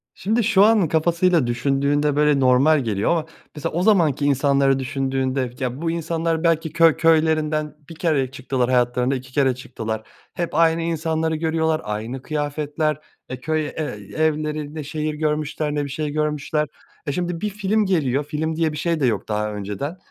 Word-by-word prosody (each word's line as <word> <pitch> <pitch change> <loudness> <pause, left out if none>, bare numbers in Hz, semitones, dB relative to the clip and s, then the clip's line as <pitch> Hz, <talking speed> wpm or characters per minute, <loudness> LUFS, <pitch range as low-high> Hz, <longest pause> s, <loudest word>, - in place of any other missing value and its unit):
Şimdi 220 +5 0
şu 200 -2 +4
anın 210 -5 +4
kafasıyla 170 -2 +2
düşündüğünde, 140 +4 +1
böyle, 150 -1 +3
normal 135 +4 +4
geliyor 110 -3 0
ama 165 -2 +1 0.3
mesela 150 - -4
o 175 +2 0
zamanki 165 -10 +3
insanları 140 -1 +3
düşündüğünde, 130 -1 -1
ya, 130 +3 -3
bu 165 - 0
insanlar 165 0 -1
belki 165 -2 +1
köy 165 -2 +5
köylerinden 155 -2 +2
1 165 - -9
kereye 145 -6 0
çıktılar 130 -1 -1
hayatlarında, 125 +1 +2
2 130 0 -8
kere 135 -3 +2
çıktılar. 110 -3 -5 0.3
Hep 170 -3 -3
aynı 165 0 +3
insanları 160 -1 -1
görüyorlar 160 0 0
aynı 110 +5 -4
kıyafetler 150 0 -2 0.3
e, 130 0 -5
köy 155 +3 -1
e - - -6 0.5
evlerinde 155 -1 -1
ne 150 - -4
şehir 155 +1 -3
görmüşler 150 0 -2
ne 145 - 0
bir 140 - -5
şey 150 +2 -3
görmüşler. 150 0 -1 0.4
E, - - +1
şimdi 175 +1 -3
bir 210 - -1
film 210 +1 0
geliyor 145 -7 +1
film 155 +2 -3
diye 160 -1 +1
bir 150 - -6
şey 165 +1 0
de 135 - +2
yok 110 -6 0
daha 105 0 -2
önceden, 105 - -5
150 Hz, 170 wpm, -22 LUFS, 135-160 Hz, 0.5 s, köy